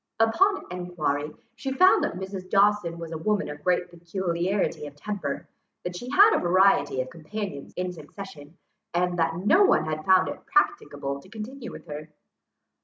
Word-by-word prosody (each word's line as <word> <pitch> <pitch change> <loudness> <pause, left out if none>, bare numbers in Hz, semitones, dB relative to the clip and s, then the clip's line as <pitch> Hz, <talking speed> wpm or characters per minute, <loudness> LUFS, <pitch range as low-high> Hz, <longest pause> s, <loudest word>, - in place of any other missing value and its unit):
Upon 380 - +3
enquiry 155 -5 -2 0.2
she 255 +3 -4
found 370 +8 +5
that - - -1
Mrs. 190 0 -6
Dawson 200 -4 +3
was 165 -1 -7
a 160 - -4
woman 210 +4 0
of 150 0 -8
great 180 0 +2
peculiarity 175 0 -2
of 145 - -12
temper, 155 -4 -4 0.4
that 180 0 -4
she 245 +8 -6
had 405 +10 +7
had - - +3
a - - +1
variety 175 -7 +3
of 130 - -6
companions 165 -2 -6
in 180 0 -2
succession, 155 -1 -11 0.4
and 175 0 +1
that 165 0 +1
no 265 - +5
one 385 - +4
had 155 0 -3
found 185 +1 +5
it - - -6
practicable 295 - 0
to 185 - -17
continue 235 +4 -7
with - - -10
her. 150 +1 -7
180 Hz, 175 wpm, -26 LUFS, 155-210 Hz, 0.4 s, had